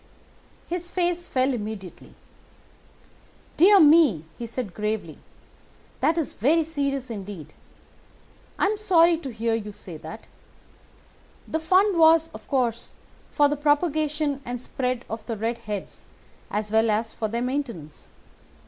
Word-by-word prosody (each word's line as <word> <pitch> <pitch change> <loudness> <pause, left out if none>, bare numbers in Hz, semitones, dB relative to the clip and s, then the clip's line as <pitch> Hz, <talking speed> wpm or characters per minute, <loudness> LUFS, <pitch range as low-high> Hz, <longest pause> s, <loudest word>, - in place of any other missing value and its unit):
"His 350 0 -4
face 350 -1 -1
fell 260 +1 +1
immediately. 210 -5 -7 1.4
"'Dear 395 +4 +7
me!' 295 - +5
he 235 - -6
said 230 -4 -5
gravely, 215 +1 -3 0.8
'that 325 - +2
is 320 -5 -1
very 310 +9 +2
serious 280 -5 -3
indeed! 200 -6 -8 1.0
I - - +2
am 420 +2 0
sorry 345 -5 +4
to 280 - -6
hear 225 0 -1
you 215 -2 -3
say 195 -5 -9
that. 160 +8 -10 1.2
The 320 - -1
fund 370 +3 +3
was, 325 0 +5
of - - -11
course, 240 -4 -1 0.4
for 290 - +3
the 295 - -1
propagation 295 -1 0
and 245 0 -5
spread 255 0 -3
of 225 0 -6
the 230 -2 -3
red 230 +2 -2
heads 205 -2 -5 0.4
as 210 0 -3
well 220 +1 +3
as 220 +1 0
for 220 - -2
their 235 +3 -2
maintenance. 245 - -5
255 Hz, 135 wpm, -25 LUFS, 220-320 Hz, 1.4 s, Dear